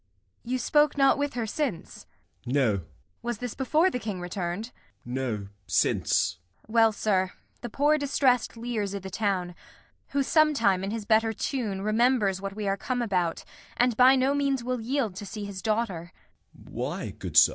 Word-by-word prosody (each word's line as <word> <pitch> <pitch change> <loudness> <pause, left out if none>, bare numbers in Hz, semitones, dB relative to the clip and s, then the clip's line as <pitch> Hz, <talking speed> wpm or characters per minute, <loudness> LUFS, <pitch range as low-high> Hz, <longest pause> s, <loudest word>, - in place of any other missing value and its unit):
You 255 +2 -1
spoke 295 +4 +2
not 275 0 +4
with 285 -2 -1
her 235 -2 -1
since? 220 - -4 0.4
Gent. 125 - -3
No. 130 -6 +4
Kent. 85 -4 -9 0.3
Was 240 -2 -3
this 245 0 -5
before 310 +7 +2
the 250 - -2
King 210 -5 -4
return'd? 175 +2 -3
Gent. 235 - -10 0.3
No, 120 -5 -3 0.2
since. 90 -1 +1 0.3
Kent. - - -16
Well, 225 -1 +5
sir, 190 -3 0 0.3
the 240 - -5
poor 295 +6 +2
distressed 265 -4 +1
Lear's 225 -4 -3
i' - - -3
th' 190 0 -8
town; 185 -4 -1 0.5
Who 280 0 0
sometime, 260 - +3
in 195 - -2
his 220 0 -4
better 225 +1 +3
tune, 215 -5 -3
remembers 215 -3 +2
What 195 0 -5
we 210 -1 -3
are 195 0 +1
come 245 +3 -2
about, 180 -6 -1 0.3
and 245 -1 +3
by 255 +3 +7
no 265 +1 +2
means 275 -3 0
Will 250 -1 -2
yield 235 -4 -1
to 205 - -6
see 205 +1 -6
his 195 -2 -6
daughter. 210 -6 -2 0.4
Gent. - - -17
Why, - - -4
good - - -5
sir? - - +9
220 Hz, 185 wpm, -27 LUFS, 190-255 Hz, 0.5 s, sir